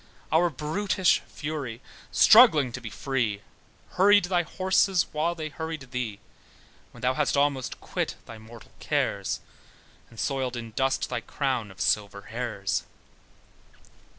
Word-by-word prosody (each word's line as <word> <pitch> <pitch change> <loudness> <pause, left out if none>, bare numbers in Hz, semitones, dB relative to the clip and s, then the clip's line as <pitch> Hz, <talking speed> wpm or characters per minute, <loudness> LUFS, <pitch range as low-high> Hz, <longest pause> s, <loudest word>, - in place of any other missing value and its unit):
Our 170 +2 +4
brutish 175 +6 +1
fury 145 -7 -5 0.3
struggling 140 -6 +7
to 130 - -6
be 115 - -6
free, 115 -3 -2 0.5
Hurried 205 +1 +5
thy 175 -1 +1
horses 185 +1 +2
while 160 +3 0
they 155 -2 -5
hurried 160 -4 -6
thee, 120 -5 -3 0.7
When 120 - -15
thou 125 +1 +2
hadst 145 +1 0
almost 140 -2 0
quit - - -3
thy 115 -1 -10
mortal 110 +1 -14
cares, - - -1 0.7
And 115 - -14
soiled 130 -3 -1
in 115 -1 -7
dust 135 +4 0
thy - - -2
crown 130 -7 -2
of 95 -2 -15
silver 100 +3 0
hairs. 110 -4 -3
135 Hz, 130 wpm, -27 LUFS, 115-160 Hz, 0.7 s, struggling